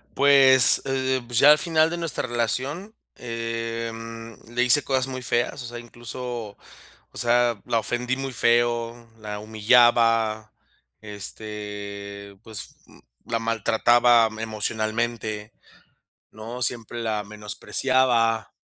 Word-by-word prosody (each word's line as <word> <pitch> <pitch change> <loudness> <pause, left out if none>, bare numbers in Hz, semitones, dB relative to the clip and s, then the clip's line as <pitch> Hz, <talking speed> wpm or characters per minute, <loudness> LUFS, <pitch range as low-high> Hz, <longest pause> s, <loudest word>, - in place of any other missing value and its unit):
Pues, 135 -2 +7
eh, 130 -1 -1
pues 120 -1 -1
ya 145 +3 +8
al 150 - +6
final 160 -1 +2
de 170 - -4
nuestra 165 -6 -3
relación, 130 - -2 0.2
em, 115 -1 -6 0.2
le 125 - +1
hice 125 +3 +4
cosas 130 -1 0
muy 130 -1 -6
feas, 120 +2 -1
o - - -8
sea, 120 0 -8
incluso, 120 -2 -7 0.5
o - - -21
sea, 120 -2 +2
la 115 - +1
ofendí 125 +3 -2
muy 135 0 -5
feo, 120 0 0
la 105 -1 -7
humillaba, 110 0 +2 0.5
este, 100 -1 -8
pues, 110 -4 -9
mm, - - -19 0.3
la 115 - +2
maltrataba 115 +1 +3
emocionalmente, 110 0 -3 0.8
¿no?, 115 +3 -8
siempre 120 0 -2
la 110 -2 -2
menospreciaba, 115 +2 0
115 Hz, 115 wpm, -24 LUFS, 110-125 Hz, 0.8 s, ya